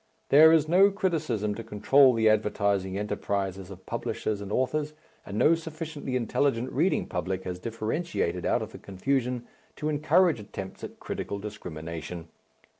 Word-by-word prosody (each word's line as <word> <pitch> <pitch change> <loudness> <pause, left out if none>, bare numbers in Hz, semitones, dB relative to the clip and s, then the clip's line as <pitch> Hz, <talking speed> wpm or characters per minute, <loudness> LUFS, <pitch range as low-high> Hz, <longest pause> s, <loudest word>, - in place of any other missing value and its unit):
There 155 +3 +8
is 160 -2 +4
no 190 +5 +6
criticism 155 - -1
to 115 +2 -7
control 130 +5 +4
the 110 -1 +3
advertising 100 -3 +1
enterprises 100 -2 -3
of 95 -1 -11
publishers 105 -2 -3
and 100 0 -7
authors, 150 +5 0 0.3
and 100 - -5
no 155 - +5
sufficiently 155 -4 -5
intelligent 125 0 0
reading 165 +8 +1
public 95 0 -3
has 90 -1 -5
differentiated 115 - -2
out - - +1
of - - -8
the - - -10
confusion 125 +4 -2 0.3
to 150 - -2
encourage 155 +1 +3
attempts 95 -2 -8
at - - -8
critical 100 - -4
discrimination. 85 -4 -7
115 Hz, 145 wpm, -27 LUFS, 100-150 Hz, 0.3 s, There